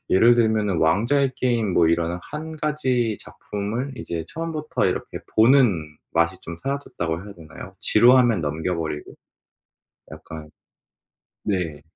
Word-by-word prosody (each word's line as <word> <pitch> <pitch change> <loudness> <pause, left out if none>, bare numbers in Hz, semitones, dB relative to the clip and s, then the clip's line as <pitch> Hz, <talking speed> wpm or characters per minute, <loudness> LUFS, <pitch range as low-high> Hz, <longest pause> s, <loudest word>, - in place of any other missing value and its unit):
예를 115 +5 +6
들면은 110 -6 +1
왕좌의 120 - +2
게임 115 -6 0
뭐 85 -2 +4
이런 85 +1 0
1 155 +1 -6
가지 130 -7 0
작품을 110 +7 -5
이제 80 -2 -5
처음부터 160 -2 -2
이렇게 - - -3 0.2
보는 110 - +4 0.2
맛이 85 +2 +2
좀 85 -1 -7
사라졌다고 90 -9 -4
해야 105 - -9
되나요. 80 -3 -11
지루하면 120 -2 +5
넘겨버리고. 80 0 -3 1.0
약간 80 -1 -10 0.9
네. 85 -7 -2
105 Hz, 270 characters per minute, -23 LUFS, 85-130 Hz, 1.0 s, 예를